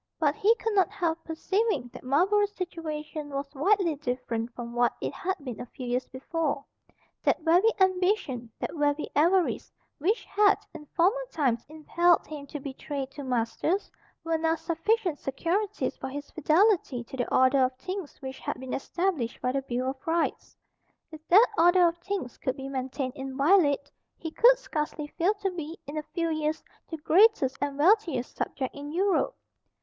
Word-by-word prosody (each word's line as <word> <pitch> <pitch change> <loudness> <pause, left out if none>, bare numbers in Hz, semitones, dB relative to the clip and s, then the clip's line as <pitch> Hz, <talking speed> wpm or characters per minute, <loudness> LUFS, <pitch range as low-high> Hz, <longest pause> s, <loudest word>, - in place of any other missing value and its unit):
But 295 -3 +3
he 430 +8 +3
could 450 -2 -2
not 385 -2 +3
help 330 -4 -2
perceiving 375 - -1
that - - -9
Marlborough's 395 +10 +2
situation 310 -4 -5
was 280 0 -5
widely 355 +3 +2
different 245 -4 -3
from 235 -1 -6
what 240 0 +2
it - - -3
had 380 +2 -2
been 250 -5 -6
a - - -7
few 255 - -8
years 245 +1 -1
before. 280 +2 -3 0.6
That - - +1
very 345 +7 +5
ambition, 365 - +1
that - - -4
very 295 -1 0
avarice, 345 +5 +2 0.3
which 395 - 0
had, 410 0 +4 0.2
in 300 - -10
former 385 - +2
times, 255 -7 0
impelled 340 +3 +2
him 290 -2 -8
to 295 - -6
betray 275 0 -5
two 275 +2 -10
masters, 255 - -1 0.3
were 330 -1 0
now 325 0 +2
sufficient 340 +1 0
securities 375 +9 -1
for 265 - -5
his 285 +2 -7
fidelity 330 - +2
to 235 - -10
the 245 - -2
order 260 +2 +4
of 255 0 0
things 365 +4 -6
which 265 0 -6
had - - -4
been 260 0 -6
established 330 -6 -1
by 250 - 0
the 275 +1 -1
Bill 255 0 -2
of 265 +3 -15
Rights. 330 0 -1 0.5
If 315 0 -12
that 410 +7 +8
order 350 +1 +6
of 340 0 -2
things 360 -9 -4
could 260 - -1
be 270 0 -6
maintained 260 0 -3
inviolate, 280 +2 +2 0.3
he 320 - -6
could - - +6
scarcely 300 -8 -3
fail 375 +6 +3
to 395 -2 -2
be, 330 -2 -6
in 285 - -7
a 305 - -1
few 335 -2 0
years, 310 0 -1 0.3
the 320 - -4
greatest 330 - +4
and 285 -1 -2
wealthiest 325 - +2
subject 260 -2 -3
in 285 +1 -7
Europe. 390 +7 +1
310 Hz, 170 wpm, -28 LUFS, 270-365 Hz, 0.6 s, that